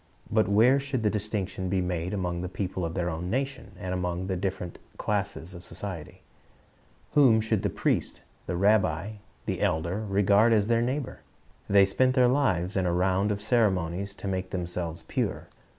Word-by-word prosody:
But 110 Hz, -2 st, +3 dB
where 120 Hz, +7 st, +5 dB
should 140 Hz, -4 st, -2 dB
the 105 Hz, -, +3 dB
distinction 100 Hz, -3 st, -3 dB
be 95 Hz, 0 st, +1 dB
made 90 Hz, -1 st, -2 dB
among 90 Hz, -4 st, -2 dB
the 90 Hz, -, -4 dB
people 95 Hz, -1 st, -3 dB
of 85 Hz, 0 st, -3 dB
their 90 Hz, -2 st, 0 dB
own 90 Hz, +1 st, -3 dB
nation, 135 Hz, -3 st, -3 dB
and 90 Hz, 0 st, -4 dB
among 90 Hz, 0 st, -2 dB
the 95 Hz, 0 st, -2 dB
different 90 Hz, -2 st, -4 dB, 0.2 s
classes 100 Hz, -3 st, -2 dB
of 85 Hz, 0 st, -10 dB
society? 95 Hz, -8 st, -7 dB, 0.9 s
Whom 130 Hz, -7 st, +6 dB
should 110 Hz, -2 st, 0 dB
the 100 Hz, -, 0 dB
priest, -, -, -1 dB, 0.3 s
the -, -, -2 dB
rabbi, 100 Hz, 0 st, +2 dB, 0.3 s
the -, -, -2 dB
elder, 85 Hz, +7 st, 0 dB
regard 100 Hz, +2 st, +4 dB
as 105 Hz, -2 st, +3 dB
neighbor? 120 Hz, +4 st, 0 dB, 0.5 s
They 100 Hz, -1 st, +6 dB
spent 130 Hz, +6 st, +2 dB
their 125 Hz, -2 st, +5 dB
lives 105 Hz, -9 st, +1 dB
in 95 Hz, -2 st, +1 dB
a -, -, +2 dB
round 95 Hz, +3 st, +2 dB
of 105 Hz, 0 st, -3 dB
ceremonies 100 Hz, -4 st, +1 dB
to 100 Hz, -, -7 dB
make 95 Hz, -1 st, -2 dB
themselves 85 Hz, -2 st, -4 dB
pure. -, -, -2 dB
95 Hz, 170 wpm, -27 LUFS, 90-110 Hz, 0.9 s, Whom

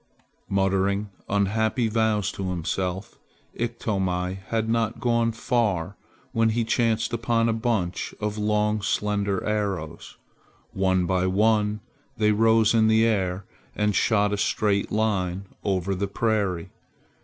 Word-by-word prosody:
Muttering 100 Hz, +1 st, +1 dB, 0.2 s
unhappy 110 Hz, +4 st, +1 dB
vows 110 Hz, -2 st, +1 dB
to 95 Hz, -1 st, -4 dB
himself, 90 Hz, +2 st, -3 dB, 0.3 s
Iktomi 95 Hz, -6 st, -2 dB
had 110 Hz, -1 st, -1 dB
not 115 Hz, 0 st, 0 dB
gone 115 Hz, 0 st, +1 dB
far 105 Hz, -6 st, -1 dB, 0.4 s
when 115 Hz, 0 st, +2 dB
he 115 Hz, +1 st, 0 dB
chanced 115 Hz, 0 st, 0 dB
upon 115 Hz, 0 st, +1 dB
a 115 Hz, -, +2 dB
bunch 110 Hz, -6 st, -2 dB
of 105 Hz, -1 st, -2 dB
long 105 Hz, 0 st, +1 dB
slender 100 Hz, -1 st, -1 dB
arrows. 100 Hz, -7 st, -3 dB, 0.6 s
One 95 Hz, -1 st, +1 dB
by 95 Hz, +1 st, +1 dB
one 105 Hz, +2 st, +2 dB, 0.4 s
they 105 Hz, -1 st, +3 dB
rose 110 Hz, +1 st, +4 dB
in 110 Hz, -1 st, +4 dB
the 110 Hz, +1 st, +4 dB
air 95 Hz, -4 st, 0 dB, 0.3 s
and 105 Hz, -1 st, +1 dB
shot 105 Hz, -2 st, +2 dB
a -, -, 0 dB
straight 100 Hz, 0 st, 0 dB
line 100 Hz, -4 st, 0 dB, 0.2 s
over 95 Hz, -1 st, 0 dB
the 100 Hz, +2 st, -2 dB
prairie. 100 Hz, -4 st, -1 dB
105 Hz, 125 wpm, -25 LUFS, 95-110 Hz, 0.6 s, rose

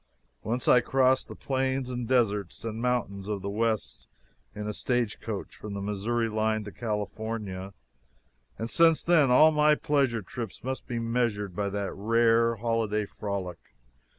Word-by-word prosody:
Once 120 Hz, +4 st, -3 dB
I 125 Hz, -, +7 dB
crossed 130 Hz, +1 st, +2 dB
the -, -, -9 dB
plains 130 Hz, -1 st, -1 dB
and 120 Hz, -2 st, -3 dB
deserts 105 Hz, -6 st, 0 dB
and 115 Hz, 0 st, -4 dB
mountains 115 Hz, -6 st, -1 dB
of 105 Hz, -3 st, -3 dB
the 100 Hz, -, -3 dB
West 110 Hz, 0 st, -2 dB, 0.5 s
in 105 Hz, 0 st, -5 dB
a 105 Hz, -, -2 dB
stagecoach, 115 Hz, -3 st, -2 dB
from 105 Hz, -1 st, -7 dB
the -, -, -3 dB
Missouri 105 Hz, +4 st, -1 dB
line 110 Hz, 0 st, 0 dB
to 105 Hz, -, -8 dB
California, 105 Hz, -3 st, -4 dB, 0.8 s
and 115 Hz, -, -3 dB
since 165 Hz, +5 st, +4 dB
then 165 Hz, -6 st, +4 dB
all 155 Hz, +6 st, +7 dB
my 150 Hz, 0 st, +4 dB
pleasure 135 Hz, -8 st, +1 dB
trips 115 Hz, +2 st, -7 dB
must 130 Hz, +1 st, -4 dB
be 120 Hz, -, -3 dB
measured 115 Hz, -5 st, -1 dB
to 100 Hz, 0 st, -1 dB
that 100 Hz, 0 st, -3 dB
rare 115 Hz, +2 st, +3 dB
holiday 110 Hz, -2 st, 0 dB
frolic. 100 Hz, -, -6 dB
115 Hz, 150 wpm, -28 LUFS, 105-125 Hz, 0.8 s, I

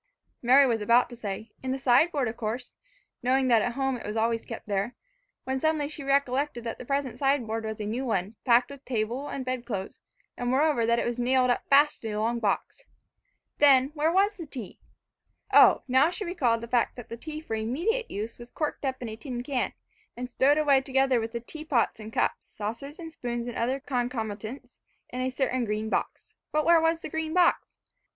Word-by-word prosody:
Mary 260 Hz, +3 st, +6 dB
was 230 Hz, -4 st, +1 dB
about 235 Hz, +4 st, +4 dB
to -, -, -7 dB
say, 215 Hz, -1 st, -6 dB
"In 260 Hz, -, -4 dB
the 265 Hz, -, -1 dB
sideboard 270 Hz, +2 st, +3 dB
of 220 Hz, -, -4 dB
course," 235 Hz, +3 st, -4 dB, 0.5 s
knowing 260 Hz, +1 st, +2 dB
that 230 Hz, -2 st, +5 dB
at 240 Hz, -, -1 dB
home 270 Hz, 0 st, -1 dB
it -, -, -10 dB
was 210 Hz, +2 st, -3 dB
always 230 Hz, +1 st, +1 dB
kept 230 Hz, -, -7 dB
there, 200 Hz, +3 st, -1 dB, 0.5 s
when 265 Hz, 0 st, -2 dB
suddenly 310 Hz, 0 st, +1 dB
she 305 Hz, 0 st, -7 dB
recollected 275 Hz, -1 st, 0 dB
that 230 Hz, -1 st, -5 dB
the -, -, -8 dB
present 270 Hz, -3 st, -2 dB
sideboard 235 Hz, -5 st, 0 dB
was 220 Hz, 0 st, -4 dB
a 210 Hz, -, -3 dB
new 230 Hz, +5 st, -2 dB
one, 205 Hz, -4 st, -1 dB
packed 245 Hz, +2 st, +4 dB
with 280 Hz, -1 st, -11 dB
table 245 Hz, +3 st, -2 dB
and 265 Hz, -, -5 dB
bed 255 Hz, -1 st, -2 dB
clothes, 200 Hz, -6 st, -5 dB, 0.3 s
and 245 Hz, 0 st, -2 dB
moreover 265 Hz, -3 st, +2 dB
that 235 Hz, 0 st, +3 dB
it -, -, 0 dB
was 240 Hz, 0 st, -2 dB
nailed 250 Hz, +1 st, +3 dB
up 245 Hz, -, -2 dB
fast 290 Hz, 0 st, +4 dB
in 220 Hz, -1 st, -3 dB
a -, -, -1 dB
long 235 Hz, +2 st, 0 dB
box. 220 Hz, -, -2 dB, 0.8 s
Then, 270 Hz, -2 st, +6 dB
where 310 Hz, +1 st, +1 dB
was 400 Hz, +3 st, +2 dB
the 335 Hz, -4 st, -7 dB
tea? 250 Hz, -8 st, -8 dB, 0.7 s
O, -, -, +7 dB
now 260 Hz, +4 st, +4 dB
she 360 Hz, +4 st, -5 dB
recalled 255 Hz, -11 st, +1 dB
the 235 Hz, -, -6 dB
fact 240 Hz, 0 st, +1 dB
that 245 Hz, -, -10 dB
the 230 Hz, -, -5 dB
tea 305 Hz, +5 st, -7 dB
for 310 Hz, -, -7 dB
immediate 325 Hz, -, -1 dB
use 215 Hz, +4 st, -5 dB
was 240 Hz, 0 st, -10 dB
corked 305 Hz, +2 st, -3 dB
up 260 Hz, -2 st, -2 dB
in 235 Hz, -, -4 dB
a 220 Hz, -, -6 dB
tin 245 Hz, 0 st, -6 dB
can 255 Hz, -1 st, -1 dB, 0.5 s
and 250 Hz, 0 st, -5 dB
stowed 280 Hz, +4 st, +3 dB
away 285 Hz, -3 st, +4 dB
together 265 Hz, -1 st, +2 dB
with 225 Hz, 0 st, -4 dB
the 235 Hz, -, -3 dB
teapot 285 Hz, -3 st, -1 dB
and 215 Hz, 0 st, -8 dB
cups, -, -, -1 dB
saucers, 230 Hz, +9 st, -6 dB
spoons 240 Hz, -4 st, -4 dB
and 240 Hz, -, -6 dB
other 255 Hz, +4 st, 0 dB
concomitants, 245 Hz, -2 st, -4 dB, 0.3 s
in 250 Hz, -, -4 dB
a 255 Hz, -, 0 dB
certain 255 Hz, -1 st, 0 dB
green 215 Hz, 0 st, -2 dB
box. -, -, -3 dB, 0.2 s
But 305 Hz, 0 st, +1 dB
where 335 Hz, -1 st, +6 dB
was 325 Hz, 0 st, +1 dB
the -, -, -6 dB
green 320 Hz, +1 st, -3 dB
box? 355 Hz, -1 st, +3 dB
250 Hz, 210 wpm, -27 LUFS, 230-280 Hz, 0.8 s, O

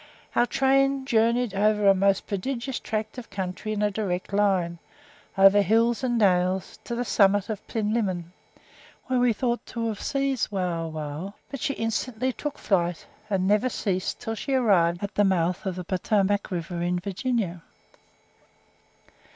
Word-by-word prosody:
Our 240 Hz, -, +4 dB
train 270 Hz, +1 st, +2 dB
journeyed 235 Hz, -2 st, +2 dB
over 210 Hz, +1 st, +2 dB
a 195 Hz, -, +8 dB
most 195 Hz, 0 st, +2 dB
prodigious 245 Hz, +5 st, -3 dB
tract 215 Hz, +3 st, -4 dB
of 235 Hz, -, -11 dB
country 190 Hz, +2 st, -4 dB
in 210 Hz, -1 st, -1 dB
a 210 Hz, -, +2 dB
direct 195 Hz, -2 st, -3 dB
line, 185 Hz, -4 st, +1 dB, 0.6 s
over 195 Hz, +1 st, +7 dB
hills 230 Hz, +5 st, +2 dB
and 240 Hz, -2 st, +1 dB
dales, 185 Hz, -2 st, +1 dB
to 235 Hz, -, -3 dB
the 245 Hz, +1 st, -2 dB
summit 200 Hz, -2 st, +3 dB
of 215 Hz, -3 st, -4 dB
Plinlimmon, 205 Hz, -6 st, -1 dB, 0.7 s
where 255 Hz, -1 st, 0 dB
we 245 Hz, -1 st, +4 dB
thought 240 Hz, +2 st, -1 dB
to 230 Hz, -1 st, -3 dB
have 215 Hz, -, -5 dB
seized 275 Hz, -3 st, 0 dB
Wauwau; 165 Hz, -2 st, -3 dB, 0.2 s
but 275 Hz, -, -5 dB
she 280 Hz, -, -1 dB
instantly 225 Hz, +3 st, -2 dB
took 295 Hz, +2 st, -5 dB
flight, 175 Hz, -3 st, 0 dB, 0.2 s
and 190 Hz, -2 st, +1 dB
never 210 Hz, +5 st, +3 dB
ceased 190 Hz, -6 st, -2 dB
until 225 Hz, -, -2 dB
she 270 Hz, +5 st, -2 dB
arrived 180 Hz, -8 st, +3 dB
at 200 Hz, -, -4 dB
the 205 Hz, -, +3 dB
mouth 185 Hz, 0 st, +1 dB
of 185 Hz, -, -2 dB
the 180 Hz, -, -5 dB
Potomac 200 Hz, +2 st, 0 dB
river 175 Hz, -1 st, -4 dB
in 175 Hz, +1 st, 0 dB
Virginia. 195 Hz, -2 st, -2 dB
205 Hz, 155 wpm, -26 LUFS, 185-235 Hz, 0.7 s, a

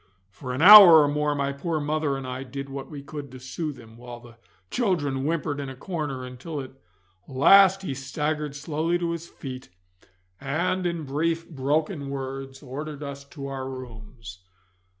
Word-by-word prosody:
For 125 Hz, +6 st, -7 dB
an 130 Hz, +5 st, -1 dB
hour 185 Hz, -6 st, +11 dB
or -, -, +2 dB
more 150 Hz, 0 st, 0 dB
my 140 Hz, -1 st, -1 dB
poor 155 Hz, +3 st, -3 dB
mother 150 Hz, -1 st, -1 dB
and 135 Hz, -, -7 dB
I 130 Hz, 0 st, -5 dB
did 140 Hz, +1 st, -7 dB
what 135 Hz, 0 st, -7 dB
we 145 Hz, -3 st, -8 dB
could 145 Hz, 0 st, -8 dB
to 130 Hz, -, -9 dB
soothe 145 Hz, +3 st, -5 dB
him, 115 Hz, -1 st, -15 dB
while 120 Hz, 0 st, -10 dB
the 120 Hz, -1 st, -17 dB, 0.3 s
children 145 Hz, -, -1 dB
whimpered 150 Hz, -2 st, -2 dB
in 140 Hz, -1 st, -5 dB
a 130 Hz, -, -8 dB
corner, 145 Hz, -4 st, -5 dB
until 130 Hz, +5 st, -7 dB
at 130 Hz, -1 st, -7 dB, 0.6 s
last 195 Hz, +8 st, +5 dB
he 160 Hz, -, -3 dB
staggered 150 Hz, +2 st, -3 dB
slowly 155 Hz, +3 st, -1 dB
to 170 Hz, -1 st, -2 dB
his 170 Hz, 0 st, -6 dB
feet, 130 Hz, -2 st, -9 dB, 0.7 s
and 175 Hz, +6 st, -1 dB
in 170 Hz, -2 st, -3 dB
brief 160 Hz, +4 st, -2 dB
broken 150 Hz, +1 st, -2 dB
words 135 Hz, 0 st, -6 dB
ordered 145 Hz, +2 st, -7 dB
us 140 Hz, -1 st, -7 dB
to 140 Hz, -1 st, -9 dB
our 135 Hz, -1 st, -5 dB
rooms. 115 Hz, -5 st, -10 dB
140 Hz, 170 wpm, -25 LUFS, 130-155 Hz, 0.7 s, hour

